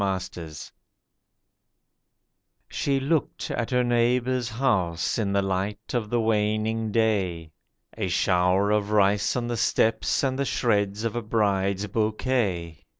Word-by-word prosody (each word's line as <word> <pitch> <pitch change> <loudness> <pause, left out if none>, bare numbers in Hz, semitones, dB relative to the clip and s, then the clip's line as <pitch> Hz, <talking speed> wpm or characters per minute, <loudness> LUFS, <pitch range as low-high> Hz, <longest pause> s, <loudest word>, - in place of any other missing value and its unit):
HUSKS 90 -5 -4 2.0
SHE 140 -1 0
looked 150 +1 -1
at 120 - -2
her 125 -1 +2
neighbour's 120 +1 +1
house 105 -8 0
in 100 -3 0
the 100 0 +1
light 95 +2 -3
of 115 -4 -1
the 120 - +1
waning 110 0 0
day— 95 -8 0 0.4
A 105 -4 -2
shower 90 +2 +2
of 105 -1 +1
rice 100 -1 +2
on 120 -1 -1
the 120 -1 -2
steps, 115 +2 +1
and 130 0 0
the - - +2
shreds 105 -4 0
of 115 -1 -2
a 120 - -1
bride's 100 -3 0
bouquet. 105 - -1
105 Hz, 130 wpm, -25 LUFS, 95-120 Hz, 2.0 s, her